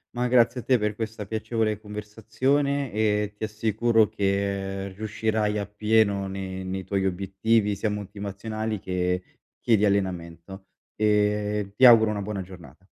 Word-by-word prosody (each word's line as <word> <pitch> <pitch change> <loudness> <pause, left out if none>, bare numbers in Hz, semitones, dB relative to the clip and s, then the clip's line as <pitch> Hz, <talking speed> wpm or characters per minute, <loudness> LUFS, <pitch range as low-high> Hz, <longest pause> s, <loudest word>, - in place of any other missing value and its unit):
Ma 125 +1 0
grazie 120 0 +3
a - - -7
te 130 - +3
per 105 -1 -1
questa 110 -1 -5
piacevole 110 0 -1
conversazione 115 +7 -1
e 105 -1 0
ti 110 - -2
assicuro 110 +1 +2
che 100 -1 -2
riuscirai 110 +1 -1
appieno 105 -1 +1
ne 95 -1 -5
nei 95 0 -4
tuoi 95 0 -1
obiettivi 100 +3 0
sia 105 +2 -1
motivazionali 105 +1 -4
che 90 0 -1 0.4
che 115 - +4
di 105 - +2
allenamento, 95 -1 -2 0.3
ehm, 105 -1 +1
ti 130 - +6
auguro 115 -3 +8
una 105 -1 -2
buona 100 -1 -4
giornata. 90 -7 -13
105 Hz, 140 wpm, -25 LUFS, 95-110 Hz, 0.4 s, auguro